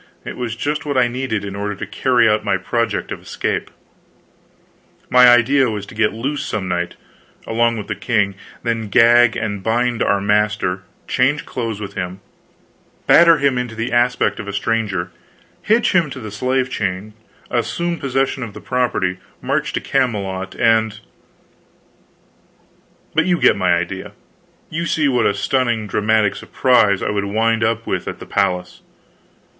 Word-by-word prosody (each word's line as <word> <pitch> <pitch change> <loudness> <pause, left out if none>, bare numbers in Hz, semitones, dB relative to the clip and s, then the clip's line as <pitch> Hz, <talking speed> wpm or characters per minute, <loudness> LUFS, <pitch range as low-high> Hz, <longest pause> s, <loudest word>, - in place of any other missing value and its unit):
It - - -6
was 120 -2 -4
just 150 +5 -2
what 145 -2 -2
I 125 -1 +4
needed, 120 -4 -3
in 100 0 -6
order 105 +1 -3
to - - -6
carry 125 -4 +2
out 105 0 +2
my 100 -2 +1
project 115 +4 -2
of - - -5
escape. - - -3 1.4
My 125 0 +7
idea 125 +2 +4
was 105 -2 -4
to - - -13
get 110 -1 +1
loose 135 +6 -3
some 95 -3 -3
night, 85 -1 -2 0.5
along 115 +1 +1
with 105 - -5
the 105 - -3
king, 105 -1 0 0.3
then 115 -2 -2
gag 120 +1 +5
and 105 -2 -3
bind 120 +2 0
our 100 - +2
master, 105 -2 0 0.3
change 135 +4 +1
clothes 115 -4 -4
with 100 -2 -7
him, 90 0 -5 0.9
batter 170 -1 +7
him 140 -3 +1
into 120 -2 -4
the 115 +2 -3
aspect 120 +1 +1
of 100 - -6
a 100 - -5
stranger, 100 -4 -1 0.5
hitch 225 +2 +2
him 175 -5 +2
to 135 - -7
the 110 -4 -7
slave 130 +4 -1
chain, 100 0 -3 0.4
assume 170 -1 -1
possession 135 0 -1
of 110 -5 -6
the - - -7
property, 120 -8 -1 0.2
march - - -1
to - - 0
Camelot, 100 -8 -2
and 110 -1 +2 2.1
But 160 - +2
you 175 -2 +2
get - - +5
my 90 -3 +2
idea; 95 +3 -4 0.5
you 170 +2 -3
see 155 -3 +1
what 125 -3 +2
a 100 - 0
stunning 120 +1 0
dramatic 105 0 +1
surprise 110 -7 +2
I - - -1
would 100 -1 -1
wind 110 +2 +1
up 115 0 0
with - - -3
at - - -4
the - - -10
palace. 90 0 -1
115 Hz, 160 wpm, -19 LUFS, 100-125 Hz, 2.1 s, My